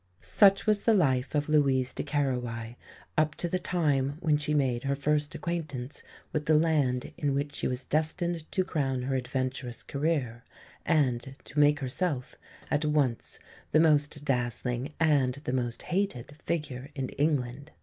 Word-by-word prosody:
Such 195 -1 +4
was 210 -2 +2
the 225 - +5
life 130 -7 +2
of 145 0 +1
Louise 135 -4 +3
de - - -3
Querouaille 125 -6 -2 0.4
up 155 -1 +1
to 175 - -2
the 185 +2 -1
time 145 -6 0
when 160 -4 +2
she 150 0 -1
made 130 -4 +1
her 140 0 +1
first 150 +1 0
acquaintance 150 -6 -4 0.3
with 150 -1 -2
the 155 -1 +5
land 145 -6 +1
in 140 -2 +1
which 145 +1 -2
she - - -1
was 125 0 -3
destined 160 +2 -1
to 185 - +1
crown 135 -8 -1
her 135 +1 -1
adventurous 130 -1 -3
career, 140 -6 -1 0.4
and 135 -4 +1
to 145 - -4
make 145 0 +4
herself 135 0 -2 0.4
at 150 +1 +2
once 145 -6 0 0.4
the 155 - +6
most 150 -2 +3
dazzling 125 0 -1
and 145 -6 +3
the 125 - -2
most 120 -2 -2
hated 175 -8 -2
figure 145 -4 -4
in 135 -2 -3
England. 140 -1 -1
145 Hz, 160 wpm, -29 LUFS, 130-155 Hz, 0.4 s, the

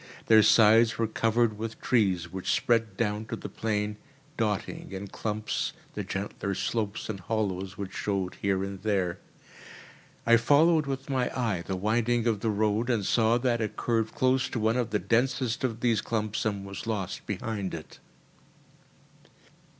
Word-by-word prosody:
Their 110 -1 +7
sides 110 +1 +6
were 115 - +1
covered 115 0 +1
with 115 0 -5
trees 95 -8 +1
which 95 -1 -2
spread 115 -4 +1
down 105 -1 -1
to - - -4
the - - -7
plain, 105 -1 -2 0.4
dotting, - - -2
in 95 +1 -6
clumps, 110 +1 -2 0.2
the - - -3
gentler 100 0 -3
slopes 105 0 -2
and 105 -3 -4
hollows 95 -1 -2
which 100 -2 -5
showed 95 -3 -2
here 95 -1 +1
and 95 -1 -6
there. 95 -4 0 1.1
I 115 0 +7
followed 150 +5 +4
with 135 -1 -4
my 130 -2 +1
eye 110 -8 0
the 95 - -1
winding 115 +4 +1
of 110 -3 +1
the 110 - -1
road, 110 +3 +1
and 110 -5 +1
saw 115 +2 +3
that 120 -1 0
it 110 - -2
curved 115 -2 0
close 130 +1 +2
to 120 - -3
one 110 +1 +2
of 125 -2 0
the 105 - +1
densest 125 +2 0
of 115 -3 -2
these 115 -4 +2
clumps 110 -2 -2
and 100 -2 -1
was 100 +3 -7
lost 100 -4 -3
behind 100 -2 -3
it. 80 - -10
110 Hz, 165 wpm, -28 LUFS, 100-115 Hz, 1.1 s, Their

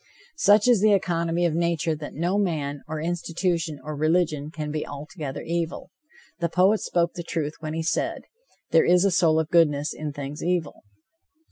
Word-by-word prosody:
Such 205 -1 +5
is 240 -6 +5
the 215 0 +5
economy 170 -2 0
of 170 - +1
nature 170 -1 0
that 150 -1 -8
no 175 +6 0
man, 145 -7 -2
or 155 0 -4
institution 170 -1 -2
or 155 0 -5
religion, 155 -1 +1
can 155 -2 -5
be 155 0 -2
altogether 145 0 -7
evil. 170 0 -3 0.5
The 170 -1 0
poet 190 +5 +3
spoke 170 -1 0
the 175 - -5
truth 155 -3 -3
when 155 0 -5
he 165 - -2
said: 160 - -1 0.5
"There 165 - +5
is 180 +2 +4
a 200 - +3
soul 160 -2 +3
of 160 -1 -2
goodness 150 -3 +3
in 150 -1 -5
things 145 +1 -6
evil." 175 -4 -1
165 Hz, 175 wpm, -25 LUFS, 150-175 Hz, 0.5 s, Such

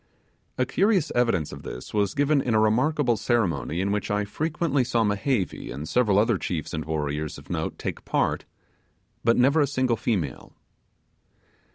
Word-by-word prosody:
A 125 - +2
curious 195 - +2
evidence 115 -11 +1
of - - -8
this 60 - -8
was 100 -2 +1
given 145 0 +3
in 120 -4 0
a - - +5
remarkable 120 +3 +2
ceremony 90 - 0
in 100 +1 0
which 105 0 -1
I 105 0 0
frequently 150 +4 0
saw 120 -2 +1
Mehevi 105 0 -1
and 75 +3 -6
several 110 -3 +2
other 110 -1 +3
chefs 80 -3 -3
and 80 -2 -3
warriors 75 -1 -2
of - - -11
note - - -2
take - - -5
part; - - 0 0.8
but 115 0 +3
never 140 +5 +4
a 145 - +3
single 130 -4 0
female. 85 - -2
110 Hz, 165 wpm, -25 LUFS, 95-130 Hz, 0.8 s, a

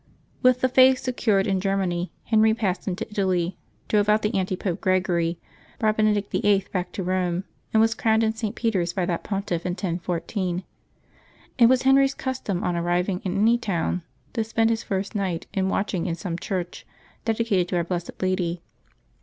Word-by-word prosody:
With 255 0 +4
the 260 - +4
Faith 260 +1 +6
secured 225 -6 +1
in 190 -2 0
Ger 195 0 +1
many, 175 -2 -1
Henry 220 0 +3
passed 200 -5 -2
into 180 -1 -3
Italy, 185 -3 0 0.3
drove 210 -1 +2
out 215 +1 +3
the 210 - 0
Antipope 185 -1 -1
Gregory, 180 -3 +1 0.4
brought 215 -1 +1
Benedict 210 -2 +1
Vlll. 200 -2 +2
back 180 -2 -2
to 190 - -3
Rome, 180 0 0 0.3
and 220 - +3
was 225 0 +4
crowned 220 0 +2
in 220 0 +1
St. 220 -2 -4
Peter's 190 -7 0
by 185 -1 0
that 175 -1 -2
Pontiff, 195 -4 -2
in 180 - -1
1014. 180 +1 -2 1.0
It 235 - +8
was 255 +1 +3
Henry's 270 +1 +4
custom, 255 -8 -3
on 180 -1 0
arriving 175 +2 0
in 190 0 -2
any 230 +4 +4
town, 180 -4 -1 0.3
to 225 - 0
spend 225 +1 +1
his 225 0 0
first 195 -1 -3
night 190 -5 -2
in 190 -1 0
watching 190 -3 -1
in 170 - -1
some 170 0 -4
church 180 0 -4 0.4
dedicated 220 -5 +1
to 180 - -3
our 175 - +2
blessed 175 0 -3
Lady. 180 -2 -1
195 Hz, 180 wpm, -24 LUFS, 180-220 Hz, 1.0 s, It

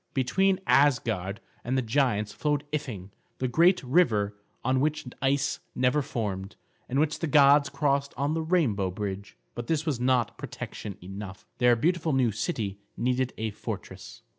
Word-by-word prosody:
Between 190 +9 +2
Asgard 110 -9 +2 0.2
and 130 +2 -1
the 130 - +1
giants 110 -4 +1
flowed 150 -1 0
Ifing, 115 -11 -4 0.3
the 130 - -1
great 170 +8 +4
river 115 - +2 0.3
on 130 +1 +2
which 150 +2 0 0.2
ice 135 +3 +1 0.2
never 130 +4 +2
formed, 100 -6 -4 0.3
and 130 - -1
which 155 0 +1
the 165 - -1
gods 145 -1 +6
crossed 140 -1 0
on 140 +2 0
the 165 - -1
rainbow 145 - +1
bridge. 100 +1 -5 0.2
But 120 0 -6
this 160 -1 0
was 145 -7 -1
not 120 -3 +1
protection 100 -3 -7
enough. 95 +1 -8
Their 125 -1 +5
beautiful 165 +4 +1
new 130 -4 +3
city 105 - -3 0.2
needed 125 +1 0
a 110 0 -2
fortress. - - -8
130 Hz, 155 wpm, -27 LUFS, 105-145 Hz, 0.3 s, gods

